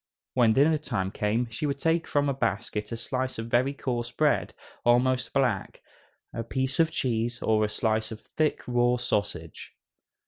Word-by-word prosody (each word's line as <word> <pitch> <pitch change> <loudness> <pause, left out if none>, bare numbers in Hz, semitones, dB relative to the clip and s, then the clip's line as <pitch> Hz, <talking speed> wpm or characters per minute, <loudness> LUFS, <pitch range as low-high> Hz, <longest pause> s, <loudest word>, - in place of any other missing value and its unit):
When 120 -3 +4
dinner 150 +5 +4
time 95 -10 -2
came, 110 +5 0
she 130 +7 -2
would 140 -1 -1
take 165 +3 +1
from 145 -1 +1
a 140 - +1
basket 110 -3 -2
a 115 - -3
slice 130 +2 -3
of 115 +1 -5
very 130 +3 +3
coarse 120 -4 -3
bread, 150 +4 +1 0.3
almost 125 +2 +3
black, 125 -8 0 0.5
a 115 - -3
piece 130 +4 -2
of 165 -1 +5
cheese, 120 -4 -1
or 110 -1 +2
a 105 - +1
slice 110 0 0
of 110 - -7
thick, 155 -1 -1
raw 120 0 +2
sausage. 100 - -3
120 Hz, 170 wpm, -27 LUFS, 110-135 Hz, 0.5 s, of